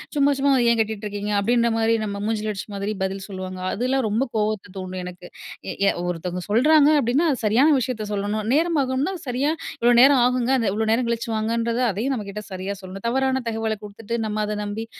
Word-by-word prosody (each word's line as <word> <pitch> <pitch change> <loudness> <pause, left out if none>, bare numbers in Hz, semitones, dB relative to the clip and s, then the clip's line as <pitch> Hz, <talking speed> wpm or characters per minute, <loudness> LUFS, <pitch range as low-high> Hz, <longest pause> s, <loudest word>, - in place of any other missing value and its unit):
''சும்மா 285 0 +4
சும்மா 280 0 +3 0.2
ஏன் 230 - +1
கேட்டுட்.ருக்கீங்க?'' 210 -1 -2
அப்டின்ற 235 +2 +2
மாரி 225 0 +2
நம்ம 200 -1 -4
மூஞ்சில 215 -1 -1
அடிச்ச 195 - -7
மாதிரி 200 +1 -2
பதில் 190 0 -3
சொல்லுவாங்க. 185 -2 -6
அதெல்லாம் 255 +3 0
ரொம்ப 220 +5 +1
கோவத்த 210 -2 -1
தூண்டும் 185 -1 -5
எனக்கு. 180 0 -9 0.4
எ - - -2
ய - - +5 0.2
ஒருத்தவங்க 180 +1 -4
சொல்றாங்க 290 +7 +5
அப்டின்னா, 265 +8 +2
அது 260 - -3
சரியான 245 +9 +4
விஷயத்த 230 -4 -3
சொல்லணும். 205 +1 -2
நேரம் 330 0 +2
ஆகும்ன்னா, 265 +8 -1
சரியா, 260 +5 0 0.3
"இவ்வளோ 240 +1 +4
நேரம் 270 -1 +6
ஆகுங்க." 250 0 +1
அந்த 230 -4 0
இவ்வளோ 220 +1 -1
நேரம் 235 +2 +1
கழிச்சு 230 0 -3
வாங்கன்றது, 230 +2 -1
அதயும் 230 +8 -1
நம்ம 210 -4 -5
கிட்ட 210 +1 -6
சரியா 190 +2 -4
சொல்லணும். 190 +3 -9
தவறான 265 +1 0
தகவல 225 0 -1
குடுத்துட்டு, 210 +2 -8
நம்ம 210 0 -3
அத 210 - -3
நம்பி, 210 +2 -4
220 Hz, 190 wpm, -23 LUFS, 200-255 Hz, 0.4 s, நேரம்